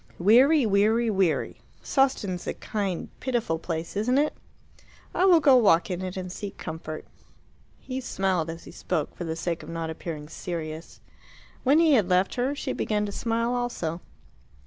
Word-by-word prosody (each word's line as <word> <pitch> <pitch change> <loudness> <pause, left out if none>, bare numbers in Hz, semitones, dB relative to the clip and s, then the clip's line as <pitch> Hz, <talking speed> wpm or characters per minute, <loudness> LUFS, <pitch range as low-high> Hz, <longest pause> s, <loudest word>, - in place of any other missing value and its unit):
Weary, 255 - +5
weary, 220 +3 +3
weary. 190 -5 0 0.2
Sawston's 215 -10 0
a - - -2
kind, 195 -5 -3
pitiful 235 -11 -1
place, 165 +1 -4
isn't 235 +6 +1
it? 300 +1 +2 0.8
I 365 - +2
will 355 -3 +7
go 280 -4 +6
walk 195 -7 +4
in 180 0 -3
it 185 0 -5
and 185 -1 -5
seek 200 +1 -7
comfort." 155 -1 -6 0.7
He 260 0 -5
smiled 190 -8 -1
as 165 +1 -7
he - - -11
spoke, 150 - -3
for 175 - -5
the 160 -1 -3
sake 165 0 -3
of - - -10
not 165 -1 -3
appearing 160 -2 -6
serious. 160 -1 -6 0.6
When 275 +3 +5
he 325 -2 +5
had 210 -8 +3
left 185 +1 +2
her 255 +3 -1
she 275 -2 -3
began 210 -1 -1
to 205 - -4
smile 230 +3 -1
also. 180 -9 -2
195 Hz, 170 wpm, -26 LUFS, 170-245 Hz, 0.8 s, will